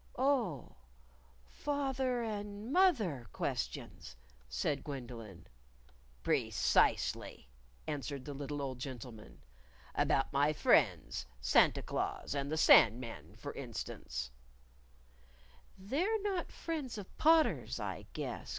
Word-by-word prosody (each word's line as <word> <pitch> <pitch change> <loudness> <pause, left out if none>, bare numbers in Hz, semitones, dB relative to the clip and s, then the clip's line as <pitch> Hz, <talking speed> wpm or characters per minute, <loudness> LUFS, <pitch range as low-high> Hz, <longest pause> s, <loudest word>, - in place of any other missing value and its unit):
"Oh, 230 - 0 0.7
fath 275 - -2
er 250 -2 +1
and 210 +2 -4
moth 370 -6 +5
er 145 - -3
questions," - - -4 0.3
said 60 0 -1
Gwendolyn. 120 - -7 0.8
"Precisely," - - +1 0.4
answered 140 -2 -4
the 145 - -5
little 145 +1 -4
old 130 -2 -4
gentleman; 125 -4 -8 0.3
" 65 0 -25
about 135 - +1
my 145 +2 +3
friends, 150 - +2
Santa 60 0 +4
Claus - - -2
and 140 0 -2
the 155 - 0
Sand 115 -6 +7
Man, 115 -3 -8
for - - -7
instance 60 -1 -5 0.7
" 60 +1 -28
"They're 390 +11 +2
not 390 -4 -2
friends 300 -8 -4
of 200 -2 -9
Potter's, 320 0 +4
I - - -5
guess. - - -5
140 Hz, 115 wpm, -34 LUFS, -, 0.8 s, Sand